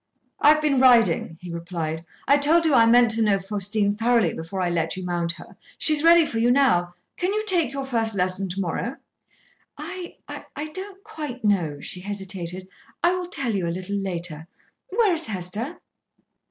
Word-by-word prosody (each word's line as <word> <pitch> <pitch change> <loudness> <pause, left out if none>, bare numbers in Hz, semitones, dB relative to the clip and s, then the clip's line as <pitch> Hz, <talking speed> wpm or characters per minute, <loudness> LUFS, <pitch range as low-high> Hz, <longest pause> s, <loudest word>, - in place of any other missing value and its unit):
"I 290 - +5
have 305 0 +4
been 280 -3 +2
riding," 230 -10 +4
he 175 -1 -8
replied. 165 -2 -4 0.2
"I 280 +1 +5
told 325 +4 +4
you 315 - +3
I 230 -3 +6
meant 240 0 +5
to 225 +1 0
know 210 -2 +3
Faustine 205 +1 0
thoroughly 225 -5 +2
before 165 +4 -6
I 180 -1 0
let 165 0 -1
you 185 - -5
mount 170 -1 -1
her. - - -13 0.2
She 310 - +4
is 300 0 +2
ready 335 0 +7
for 225 - -3
you 235 +2 +3
now. 205 -10 +2 0.2
Can 365 +2 -1
you 430 +1 -1
take 345 - +2
your 275 -1 -4
first 225 -4 0
lesson 185 +1 0
to 185 +3 -4
morrow?" 195 +8 -3 0.8
"I 350 +4 -8
I 305 +1 -7
don't 385 +3 -8
quite 300 - -7
know," 170 -8 +1
she 180 - -2
hesitated. 190 -2 -5 0.4
"I 350 +1 +4
will 365 -1 -3
tell 275 -9 -1
you 185 -4 -1
a 170 +1 -3
little 185 +2 -5
later. 175 -5 -4 0.4
Where 415 -1 +2
is 330 -5 0
Hester?" 215 - -4
220 Hz, 190 wpm, -24 LUFS, 180-295 Hz, 0.8 s, ready